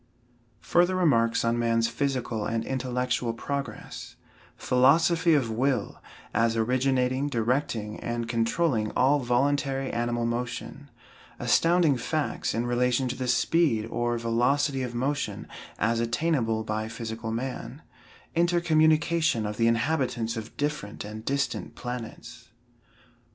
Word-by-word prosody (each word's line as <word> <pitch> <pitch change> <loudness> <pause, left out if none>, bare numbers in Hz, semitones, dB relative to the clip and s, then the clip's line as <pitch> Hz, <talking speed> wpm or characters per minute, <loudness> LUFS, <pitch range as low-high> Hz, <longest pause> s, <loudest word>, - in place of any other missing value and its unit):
FURTHER 175 +2 +2
REMARKS 115 -11 +2
ON 115 +1 +1
MAN'S 115 -1 +2
PHYSICAL 120 -3 -2
AND 115 0 -2
INTELLECTUAL 125 -2 -1
PROGRESS 140 +4 -6 0.4
PHILOSOPHY 165 +6 +4
OF 125 -6 +1
WILL, 125 -1 -1 0.3
AS 115 0 +2
ORIGINATING, 130 +3 +1
DIRECTING, 115 -3 -1
AND 120 -1 -3
CONTROLLING 115 0 +1
ALL 140 +3 +4
VOLUNTARY 135 +2 0
ANIMAL 120 0 -1
MOTION 125 +4 -4 0.5
ASTOUNDING 165 +4 +3
FACTS 150 +5 -2
IN 115 +1 0
RELATION 125 +1 +1
TO 125 - -3
THE 130 -1 -4
SPEED, 125 -3 +2
OR 120 0 0
VELOCITY 130 +4 +1
OF 125 -2 -4
MOTION, 130 -5 -2 0.3
AS 115 +2 +1
ATTAINABLE 115 -2 0
BY 110 0 -2
PHYSICAL 110 0 -5
MAN 125 +3 -5 0.5
INTERCOMMUNICATION 165 -5 +2
OF 105 0 -4
THE 115 - +3
INHABITANTS 120 -1 0
OF 110 0 -7
DIFFERENT 145 -10 -3
AND 110 +1 -8
DISTANT 140 0 -2
PLANETS. 120 -1 -7
125 Hz, 115 wpm, -27 LUFS, 115-140 Hz, 0.5 s, PHILOSOPHY